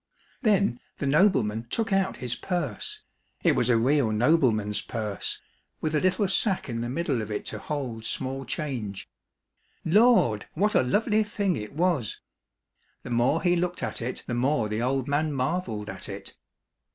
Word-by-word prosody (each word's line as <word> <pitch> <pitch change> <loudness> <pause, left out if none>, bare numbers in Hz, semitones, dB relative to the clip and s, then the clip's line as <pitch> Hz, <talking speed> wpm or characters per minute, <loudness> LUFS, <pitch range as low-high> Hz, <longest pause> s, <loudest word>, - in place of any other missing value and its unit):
Then 200 - +2 0.2
the - - -3
nobleman 130 - +3
took 225 - -1
out 195 0 +1
his 125 -2 -2
purse, 155 - -3 0.4
it - - +5
was 120 - +1
a 120 - +5
real 130 +1 +3
nobleman's 110 -4 +2
purse, 105 -3 -4 0.4
with 155 - -2
a 150 - +3
little 185 +2 +2
sack 190 -1 +1
in 115 -2 -3
the 120 - -3
middle 140 -3 -1
of 110 - -6
it 105 - -3
to 110 - -5
hold 125 -5 -4
small 135 +3 -3
change. 125 - -4 0.8
Lord! 190 - +4
what 210 +6 +2
a - - +5
lovely 210 - +2
thing 205 -3 0
it 105 -2 -6
was! 160 - 0 0.8
The 125 - -7
more 120 +7 +2
he 175 -1 +4
looked 175 -3 -1
at 115 -1 -3
it, 125 +2 -4
the 120 - -4
more 120 -1 +1
the 105 +2 -1
old 130 +1 0
man 150 +1 +1
marvelled 130 - -2
at - - -7
it. - - -8
135 Hz, 165 wpm, -27 LUFS, 115-180 Hz, 0.8 s, it